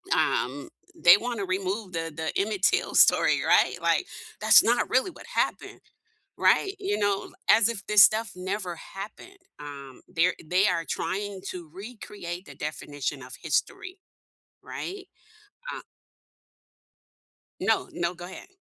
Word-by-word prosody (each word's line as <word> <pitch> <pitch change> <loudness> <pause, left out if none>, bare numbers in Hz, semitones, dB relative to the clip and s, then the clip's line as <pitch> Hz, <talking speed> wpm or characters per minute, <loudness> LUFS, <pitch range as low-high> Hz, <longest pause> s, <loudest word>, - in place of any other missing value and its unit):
um, 135 +3 -1 0.3
they 175 +2 +7
wanna 235 -3 -4
remove 190 +2 -3
the 165 -1 -3
the 160 0 -3
Emmett 200 -2 -3
Till - - +2
story, - - +5
right? - - +4
Like, - - +1 0.4
"That's - - +8
not 240 +1 +1
really 260 +8 +1
what - - -14
happened." - - -2 0.6
Right? 390 - +3
You 405 +1 -1
know, 200 -1 -1 0.2
as 215 0 +6
if 215 -4 -5
this 210 -1 +7
stuff 220 +2 +4
never 185 0 -4
happened, 205 - -10 0.2
um, 140 -3 -10
they're 180 0 +2
they 180 +5 +2
are 170 -2 -1
trying 195 +3 -3
to 175 -4 -9
recreate 195 -3 -8
the - - -11
definition 145 -2 -5
of 125 +1 -10
history, 370 +1 -2 0.7
right? 385 0 -7 0.7
Uh - - -8 1.8
No, - - 0
no, 175 0 -2
go 175 +1 -9
ahead. 190 - -11
190 Hz, 135 wpm, -26 LUFS, 170-215 Hz, 1.8 s, That's